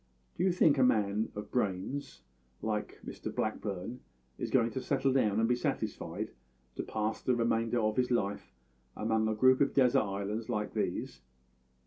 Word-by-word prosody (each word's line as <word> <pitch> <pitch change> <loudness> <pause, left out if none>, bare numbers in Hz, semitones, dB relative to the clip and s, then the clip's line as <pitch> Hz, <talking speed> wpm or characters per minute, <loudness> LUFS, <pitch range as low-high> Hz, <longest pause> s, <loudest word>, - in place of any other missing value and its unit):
Do 175 - -1
you 190 - +4
think 160 -5 +4
that - - +3
a - - +6
man 105 -2 +1
of 105 - -6
brains 105 +5 -2 0.4
like 105 -1 -2
Mr - - -6
Blackburn 110 +1 -3 0.4
is - - -2
going 120 -3 +3
to 130 - -3
settle 135 -1 +1
down 110 -6 +2
and 115 - +3
be 125 - +3
satisfied 120 - -3 0.5
to - - 0
pass 110 0 -2
the 125 - +2
remainder 115 0 +1
of 110 -1 0
his 125 -1 +2
life 105 -5 -1 0.5
among 110 0 +1
a 110 - 0
group 130 +4 +5
of 140 - +2
desert 135 0 +5
islands 105 +3 -3
like 105 -3 -2
these? - - -2
115 Hz, 170 wpm, -32 LUFS, 105-130 Hz, 0.5 s, a